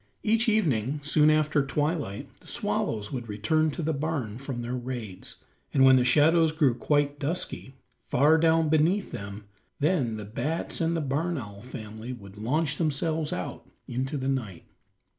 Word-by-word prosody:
Each 225 Hz, +2 st, +3 dB
evening 145 Hz, -, +1 dB
soon 150 Hz, +1 st, +4 dB
after 150 Hz, -1 st, +3 dB
twilight 145 Hz, -, -2 dB
the -, -, -18 dB
swallows 105 Hz, -2 st, -2 dB
would 120 Hz, -4 st, -5 dB
return 155 Hz, +10 st, +1 dB
to 155 Hz, +3 st, -4 dB
the 160 Hz, +1 st, 0 dB
barn 140 Hz, -7 st, -3 dB
from 135 Hz, -3 st, -5 dB
their 120 Hz, +1 st, -4 dB
raids, 120 Hz, -6 st, -6 dB, 0.4 s
and 135 Hz, -1 st, +6 dB
when 130 Hz, 0 st, +8 dB
the 125 Hz, -, +3 dB
shadows 155 Hz, +5 st, +4 dB
grew 150 Hz, -5 st, +3 dB
quite 145 Hz, +3 st, 0 dB
dusky, 155 Hz, -3 st, -3 dB, 0.2 s
far 150 Hz, +5 st, +3 dB
down 165 Hz, 0 st, +4 dB
beneath 160 Hz, +6 st, +2 dB
them, 100 Hz, +1 st, -7 dB, 0.4 s
then 140 Hz, -8 st, +1 dB
the 105 Hz, -, -6 dB
bats 150 Hz, +14 st, -2 dB
and 165 Hz, +1 st, +1 dB
the -, -, -1 dB
barn 155 Hz, +5 st, -1 dB
owl 100 Hz, -5 st, -7 dB
family 110 Hz, 0 st, -7 dB
would 100 Hz, -5 st, -11 dB
launch 150 Hz, +6 st, 0 dB
themselves 155 Hz, 0 st, 0 dB
out -, -, -5 dB, 0.2 s
into 130 Hz, +4 st, -2 dB
the 130 Hz, -1 st, -3 dB
night. 115 Hz, -11 st, -3 dB
140 Hz, 160 wpm, -27 LUFS, 120-160 Hz, 0.4 s, when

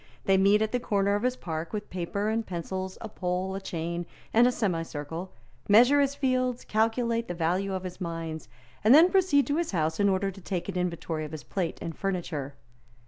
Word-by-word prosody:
They 195 Hz, -, +4 dB
meet 200 Hz, +3 st, +4 dB
at 215 Hz, -, -2 dB
the 250 Hz, -, +1 dB
corner 200 Hz, -3 st, +1 dB
of 205 Hz, -, 0 dB
his 250 Hz, +1 st, +1 dB
park 160 Hz, -6 st, -5 dB
with 210 Hz, -1 st, -5 dB
paper 185 Hz, +3 st, -2 dB
and 225 Hz, +1 st, 0 dB
pencils, 185 Hz, +1 st, -5 dB
a 225 Hz, -, -5 dB
pole, 185 Hz, -1 st, -2 dB
a 195 Hz, -, -4 dB
chain 170 Hz, -1 st, -4 dB, 0.3 s
and 235 Hz, +2 st, +6 dB
a -, -, +3 dB
semicircle, 165 Hz, -5 st, -3 dB, 0.4 s
measure 245 Hz, +7 st, +7 dB
his 280 Hz, 0 st, +1 dB
fields, 255 Hz, -3 st, 0 dB
calculate 230 Hz, +1 st, +1 dB
the 175 Hz, -, -4 dB
value 180 Hz, +4 st, 0 dB
of 185 Hz, -, -4 dB
his 185 Hz, +1 st, -7 dB
mines, 165 Hz, -2 st, -5 dB, 0.3 s
and 225 Hz, +6 st, +7 dB
then 340 Hz, +4 st, +7 dB
proceed 355 Hz, -8 st, +4 dB
to 290 Hz, +1 st, 0 dB
his 340 Hz, -9 st, -1 dB
house 160 Hz, 0 st, 0 dB
in 200 Hz, 0 st, +4 dB
order 195 Hz, +1 st, +1 dB
to 195 Hz, +1 st, -13 dB
take 180 Hz, -1 st, -3 dB
an 195 Hz, -, -4 dB
inventory 170 Hz, -3 st, -2 dB
of 155 Hz, 0 st, -7 dB
his 155 Hz, -, -6 dB
plate 180 Hz, -4 st, -3 dB
and 165 Hz, -, -5 dB
furniture. 170 Hz, -8 st, -3 dB
190 Hz, 205 wpm, -28 LUFS, 170-225 Hz, 0.4 s, measure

